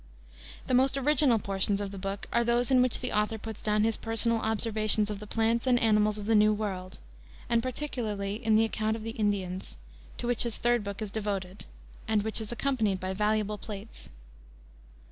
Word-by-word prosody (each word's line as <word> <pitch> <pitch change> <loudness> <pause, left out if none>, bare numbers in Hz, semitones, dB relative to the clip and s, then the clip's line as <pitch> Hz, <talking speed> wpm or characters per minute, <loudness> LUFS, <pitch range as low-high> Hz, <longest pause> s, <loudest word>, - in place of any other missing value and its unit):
The - - -2
most 265 +2 +3
original 280 -3 +3
portions 200 0 0
of 200 -1 -4
the 195 - -7
book 195 +1 -4
are 235 - +3
those 240 +2 +1
in 255 -1 +6
which 250 -2 +1
the 250 - -2
author 210 +1 0
puts 220 0 -8
down 210 -1 +1
his 225 0 +1
personal 225 0 0
observations 215 -1 +2
of 205 - -5
the 210 - -9
plants 230 +3 0
and 245 -1 +4
animals 210 -2 +3
of 205 - -6
the 225 - +2
New 215 0 +5
World, 190 -3 -4 0.5
and 235 -1 +2
particularly 225 -6 -3
the 220 0 +4
account 220 0 -1
of 220 - -7
the 225 - -4
Indians, 200 -4 -2 0.4
to - - -5
which 240 -1 0
his 235 -3 0
third 240 -2 +1
book 200 +1 -5
is 205 - -5
devoted, 200 -3 -4 0.4
and 215 -2 +1
which 220 +1 0
is 220 - -4
accompanied 235 -6 0
by 185 0 -3
valuable 210 +1 0
plates. 210 0 -9
215 Hz, 190 wpm, -29 LUFS, 205-230 Hz, 0.5 s, in